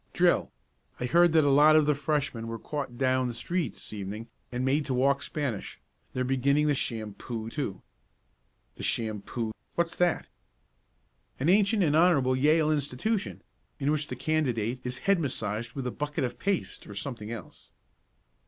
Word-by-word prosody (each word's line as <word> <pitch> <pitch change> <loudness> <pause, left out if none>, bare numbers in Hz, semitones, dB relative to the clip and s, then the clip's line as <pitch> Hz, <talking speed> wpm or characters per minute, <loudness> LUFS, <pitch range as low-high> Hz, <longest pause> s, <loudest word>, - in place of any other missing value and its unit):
"Drill. - - +3 0.5
I 125 - -1
heard 170 +6 +5
that 160 -1 +6
a 140 - +4
lot 150 +3 +7
of 155 -1 +5
the 150 - +4
Freshmen 140 -5 -1
were 115 0 -4
caught 135 0 -5
down 130 -1 +2
the 120 - -4
street 170 +2 -2
this - - -10
evening 105 +2 -6 0.2
and 125 +1 -1
made 140 +3 +2
to 130 - -1
walk 140 +2 +3
Spanish. 140 -9 -3 0.3
They're 130 - 0
beginning 135 +3 +2
the 150 - +3
shampoo, 115 -1 -4
too." 115 -11 -4 0.9
"The - - -8
shampoo 110 +1 -2 0.2
what's 170 0 0
that?" 175 -1 +2 1.1
"An 140 +6 +1
ancient 200 +2 +4
and 150 -3 +2
honorable 155 -7 +4
Yale 155 +3 +3
institution, 150 - -1 0.3
in 145 0 +1
which 150 -1 0
the - - -5
candidate 125 -6 0
is 125 0 -3
head 195 -2 +4
massaged 115 -5 -3
with 135 -2 -4
a 125 - -1
bucket 150 +2 -3
of 125 - -3
paste 185 - -2
or 105 - -9
something 115 -1 -5
else." 115 - -9
135 Hz, 165 wpm, -28 LUFS, 120-155 Hz, 1.1 s, lot